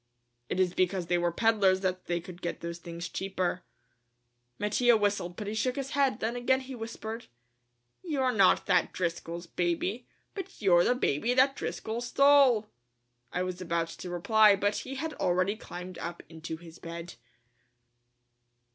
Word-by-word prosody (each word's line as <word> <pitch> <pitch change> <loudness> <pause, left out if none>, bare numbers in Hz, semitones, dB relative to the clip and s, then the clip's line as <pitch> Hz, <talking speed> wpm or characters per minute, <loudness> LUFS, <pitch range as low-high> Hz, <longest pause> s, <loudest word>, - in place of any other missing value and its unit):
"It - - -1
is 180 -2 +2
because 185 0 0
they 175 +1 +1
were 175 0 +1
peddlers 200 -2 +3
that 185 -1 -2
they 175 0 0
could 175 +1 -11
get 175 - -4
those 170 0 -5
things 170 0 -6
cheaper." 185 0 -2 1.0
Mattia 225 +3 +3
whistled, 205 -4 0
but 210 - -6
he 205 - -3
shook 250 +3 0
his 275 0 -4
head, 270 -5 +1
then 230 +2 -1
again 260 +2 +2
he 265 0 -8
whispered: 225 -1 -6 0.7
"You're 275 -7 0
not 200 -5 +4
that 185 -2 +2
Driscoll's 170 -1 -3
baby, 180 +7 -2 0.3
but 390 - -7
you're 175 -4 +5
the 245 - +3
baby 240 - 0
that 270 +1 +4
Driscoll 225 -3 -4
stole!" 265 -3 +5 0.6
I 180 - -1
was 185 0 -4
about 170 -1 -1
to 180 - -8
reply 210 +4 +5
but 205 +1 0
he 270 - -5
had 315 +3 -3
already 185 +3 +1
climbed 180 -4 -8
up 170 +1 -6
into 160 0 -7
his 165 0 -13
bed. 170 +1 -7
190 Hz, 160 wpm, -29 LUFS, 175-235 Hz, 1.0 s, you're